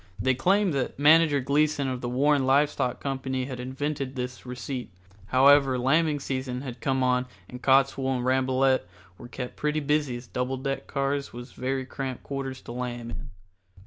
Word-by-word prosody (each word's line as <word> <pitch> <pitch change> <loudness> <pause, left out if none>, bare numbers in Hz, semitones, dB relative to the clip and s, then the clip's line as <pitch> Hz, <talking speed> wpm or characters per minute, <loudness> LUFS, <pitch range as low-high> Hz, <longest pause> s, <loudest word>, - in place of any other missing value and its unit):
They 130 +6 +2
claimed 190 +7 +2
that 135 -3 -2
Manager 150 0 +5
Gleason 145 +1 +1
of 130 -1 -3
the 120 - -3
Warren 140 +3 +2
Live 145 +2 +4
Stock 125 0 -2
Company 130 -1 -2
had 130 -2 -6
invented 135 +1 -3
this 125 0 -5
receipt. 125 -1 -5 0.4
However, 135 +1 +5
lambing 150 +4 +2
season 130 -2 -3
had 125 -3 -7
come 130 -1 +1
on 125 0 +1 0.2
and 125 0 -9
Cottswool 135 0 +3
and 125 - -3
Rambolet 130 0 +2 0.4
were - - -9
kept 125 0 -7
pretty 150 +1 0
busy 145 -3 0
as 120 - -10
double 125 +2 -2
deck 135 +1 -3
cars 140 0 -2
was 120 +1 -9
very 130 +1 -3
cramped 130 -1 -5
quarters 135 -1 -5
to - - -8
lamb 120 -1 -5
in. - - -8
130 Hz, 175 wpm, -26 LUFS, 125-140 Hz, 0.4 s, Manager